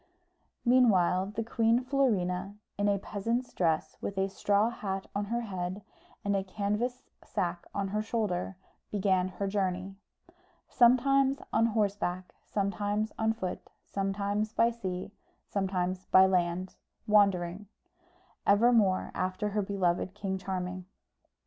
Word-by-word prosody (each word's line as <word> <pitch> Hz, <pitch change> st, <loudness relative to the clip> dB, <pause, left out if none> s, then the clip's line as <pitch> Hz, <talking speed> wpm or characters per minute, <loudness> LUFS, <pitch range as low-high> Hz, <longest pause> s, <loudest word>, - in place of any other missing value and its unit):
Meanwhile 195 Hz, -7 st, +4 dB
the 225 Hz, -, -1 dB
Queen 230 Hz, +2 st, +2 dB
Florina, 200 Hz, -8 st, 0 dB, 0.2 s
in 205 Hz, 0 st, +1 dB
a 200 Hz, -, +2 dB
peasant's 230 Hz, +6 st, -3 dB
dress, 165 Hz, -3 st, 0 dB
with 200 Hz, -, -4 dB
a 195 Hz, 0 st, +1 dB
straw 205 Hz, +3 st, +2 dB
hat 195 Hz, -4 st, -4 dB
on 205 Hz, +1 st, -1 dB
her 235 Hz, +3 st, -1 dB
head, 190 Hz, -2 st, -4 dB, 0.4 s
and 200 Hz, 0 st, +1 dB
a 195 Hz, -, 0 dB
canvas 210 Hz, +6 st, -2 dB, 0.2 s
sack 175 Hz, -1 st, -3 dB
on 200 Hz, -1 st, -1 dB
her 210 Hz, +2 st, -1 dB
shoulder, 210 Hz, -5 st, -2 dB, 0.3 s
began 190 Hz, -3 st, +1 dB
her 185 Hz, +2 st, -4 dB
journey: 190 Hz, -1 st, -1 dB, 0.7 s
sometimes 270 Hz, +2 st, +4 dB, 0.2 s
on 225 Hz, +1 st, +4 dB
horseback, 200 Hz, -4 st, -1 dB
sometimes 205 Hz, +1 st, -1 dB
on 220 Hz, 0 st, +2 dB
foot, 190 Hz, -5 st, -5 dB, 0.2 s
sometimes 200 Hz, +2 st, -1 dB
by 230 Hz, +1 st, +3 dB
sea, 185 Hz, -6 st, -5 dB, 0.3 s
sometimes 185 Hz, -2 st, -2 dB
by 190 Hz, 0 st, +7 dB
land, 180 Hz, 0 st, 0 dB, 0.3 s
wandering; 200 Hz, -2 st, +2 dB, 0.8 s
evermore 205 Hz, -2 st, +4 dB
after 185 Hz, +3 st, -1 dB
her 210 Hz, +1 st, 0 dB
beloved 190 Hz, -1 st, 0 dB
King 195 Hz, -2 st, -3 dB
Charming. 185 Hz, -1 st, -4 dB
200 Hz, 125 wpm, -30 LUFS, 185-220 Hz, 0.8 s, by